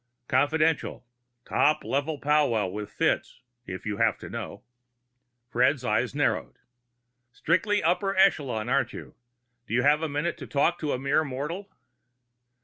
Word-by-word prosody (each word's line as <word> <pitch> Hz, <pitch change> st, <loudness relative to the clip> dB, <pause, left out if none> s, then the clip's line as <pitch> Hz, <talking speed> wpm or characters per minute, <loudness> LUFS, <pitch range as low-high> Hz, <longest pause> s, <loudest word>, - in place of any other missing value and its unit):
"Confidential. 155 Hz, +2 st, +1 dB, 0.4 s
Top 150 Hz, +2 st, +2 dB
level 145 Hz, +3 st, -1 dB
powwow 140 Hz, -8 st, +2 dB
with 105 Hz, +3 st, -5 dB
Fitz, -, -, -1 dB, 0.3 s
if 95 Hz, -, -7 dB
you 105 Hz, -1 st, -2 dB
have -, -, +2 dB
to -, -, -10 dB
know." -, -, -6 dB, 0.8 s
Fred's 125 Hz, +2 st, +1 dB
eyes 120 Hz, +5 st, 0 dB
narrowed. 145 Hz, -, 0 dB, 0.8 s
"Strictly 205 Hz, -, +1 dB
upper 195 Hz, +4 st, +1 dB
echelon, 140 Hz, -, +2 dB
aren't 130 Hz, -2 st, +1 dB
you? -, -, -9 dB, 0.5 s
Do 115 Hz, -, -2 dB
you 125 Hz, -, +2 dB
have 150 Hz, +2 st, +4 dB
a 160 Hz, -, -1 dB
minute 150 Hz, +4 st, -2 dB
to -, -, -8 dB
talk 160 Hz, +4 st, +1 dB
to 150 Hz, -2 st, -2 dB
a -, -, -1 dB
mere 140 Hz, +4 st, +1 dB
mortal?" 150 Hz, +8 st, -5 dB
145 Hz, 140 wpm, -27 LUFS, 125-160 Hz, 0.8 s, have